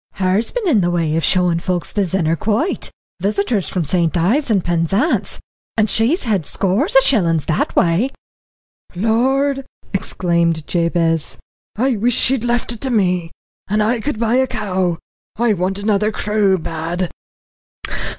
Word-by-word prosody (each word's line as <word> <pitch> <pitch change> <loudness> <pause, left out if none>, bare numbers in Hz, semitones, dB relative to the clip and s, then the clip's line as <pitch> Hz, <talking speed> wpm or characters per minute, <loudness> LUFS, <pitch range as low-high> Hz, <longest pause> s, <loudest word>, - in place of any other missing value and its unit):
"Her's 190 +4 +1
been 485 -5 -3
in 240 - +4
the 175 - +1
way 165 -3 0
of 165 - 0
showing 180 -2 +2
folk 180 0 -2
the 205 - -2
Zennor 170 -3 0
Quoit, 220 - -1 0.3
visitors 200 +1 0
from 180 -4 -2
St. 170 +2 +1
Ives 235 - +1
and 200 -5 +2
Penzance, 175 - 0 0.4
and 215 -2 +2
she's 235 - +1
had 210 -8 0
scores 205 - -1
o' - - +8
shillings 170 - +2
that 155 - -1
way." 175 +10 +2 0.9
"Lord!" 265 +7 +1 0.3
exclaimed 170 -4 0
Jabez. 165 -2 +1 0.4
"I 250 +2 +1
wish 235 +3 +1
she'd 260 -2 +2
left 240 0 0
it 235 - -8
to 265 - -1
me, 180 -7 +1 0.4
and 210 +2 +1
I 230 +3 +1
could 255 +1 -3
buy 230 +1 +2
a 260 0 +2
cow; 185 -6 -1 0.4
I 235 -1 +2
want 190 +1 -1
another 210 +1 +1
cruel 210 -3 +1
bad." 165 +2 -3
200 Hz, 150 wpm, -18 LUFS, 175-230 Hz, 0.9 s, o